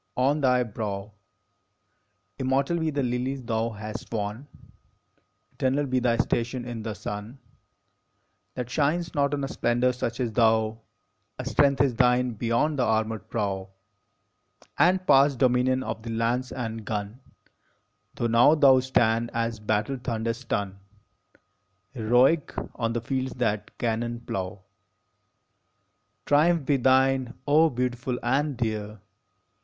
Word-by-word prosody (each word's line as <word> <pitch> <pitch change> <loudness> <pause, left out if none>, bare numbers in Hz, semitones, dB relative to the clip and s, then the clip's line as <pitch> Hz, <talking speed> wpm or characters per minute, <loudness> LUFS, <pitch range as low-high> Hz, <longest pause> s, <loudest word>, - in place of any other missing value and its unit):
on 140 +4 +2
thy 125 -2 +3
brow 105 -2 -5 1.3
Immortal 135 +5 +1
be 160 -1 0
the 145 -2 -1
lilies 125 +2 -2
thou 115 0 -1
hast 105 -1 -8
won! 110 +4 -4 1.0
Eternal 135 +2 0
be 130 -1 0
thy 120 -2 +1
station 120 +1 -1
in 120 -2 -5
the 110 -1 -5
sun, 105 +6 -6 1.2
That 125 -2 -4
shines 155 +6 0
not 140 -1 +1
on 140 - -4
a - - -1
splendor 120 -1 +1
such 120 -1 -4
as 120 -3 -1
thou! 110 -1 +2 0.6
A - - -5
strength 140 -2 +3
is 135 -3 +2
thine 125 +1 +3
beyond 120 +6 0
the - - +3
armored 110 -1 -1
prow, 95 -4 -2 1.1
And 185 +1 +3
past 135 -2 +5
dominion 130 +1 +2
of - - -5
the 115 - -8
lance 115 +3 -1
and 115 -3 -5
gun, 105 +2 -4 1.0
Tho - - -2
now 115 +6 +5
thou 135 -4 +6
stand, 120 -3 +1
as 115 -1 -1
battle 105 +5 -1
thunders 115 -1 -2
stun, 100 -5 -3 1.1
Heroic, 125 +6 +2 0.2
on 115 -1 -2
the 120 - -2
fields 130 +2 -2
that 110 -4 -2
cannon 120 0 -2
plow. 95 -3 -5 1.6
Triumph 155 +1 +3
be 140 0 +2
thine, 130 0 +2
O 155 +3 +5
beautiful 125 -1 -2
and 135 +3 0
dear! 110 -2 -3
120 Hz, 130 wpm, -26 LUFS, 110-135 Hz, 1.6 s, thou